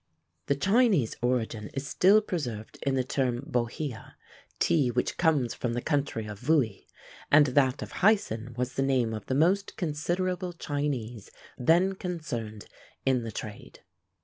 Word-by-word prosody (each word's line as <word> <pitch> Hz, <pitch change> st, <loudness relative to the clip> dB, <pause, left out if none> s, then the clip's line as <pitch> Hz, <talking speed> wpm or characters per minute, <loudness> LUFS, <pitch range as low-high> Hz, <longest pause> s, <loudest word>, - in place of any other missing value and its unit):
The 140 Hz, -, +2 dB
Chinese 195 Hz, -, +3 dB
origin 115 Hz, -3 st, -1 dB
is 135 Hz, +1 st, -3 dB
still 200 Hz, +8 st, +5 dB
preserved 125 Hz, -, -5 dB
in 135 Hz, -1 st, 0 dB
the 130 Hz, -, +1 dB
term 125 Hz, -2 st, -1 dB
Bohea, 120 Hz, 0 st, -3 dB, 0.4 s
tea 145 Hz, -6 st, +2 dB
which 120 Hz, +1 st, -1 dB
comes 150 Hz, -8 st, +2 dB
from 120 Hz, -2 st, -3 dB
the 120 Hz, -, -1 dB
country 140 Hz, -7 st, -1 dB
of 105 Hz, -2 st, -7 dB
Vouhi; 125 Hz, -6 st, +1 dB, 0.4 s
and 150 Hz, 0 st, +7 dB
that 130 Hz, 0 st, +2 dB
of -, -, -9 dB
Hyson 125 Hz, -, +2 dB
was 125 Hz, +1 st, -2 dB
the -, -, -1 dB
name 130 Hz, -4 st, +1 dB
of 110 Hz, -2 st, -6 dB
the 130 Hz, -, 0 dB
most 185 Hz, +7 st, +2 dB
considerable 180 Hz, +3 st, -2 dB
Chinese 135 Hz, -, -3 dB, 0.3 s
then 170 Hz, +9 st, +3 dB
concerned 130 Hz, -, -5 dB, 0.4 s
in 130 Hz, -2 st, +2 dB
the 115 Hz, -1 st, -5 dB
trade. 105 Hz, 0 st, -8 dB
135 Hz, 150 wpm, -28 LUFS, 120-165 Hz, 0.4 s, and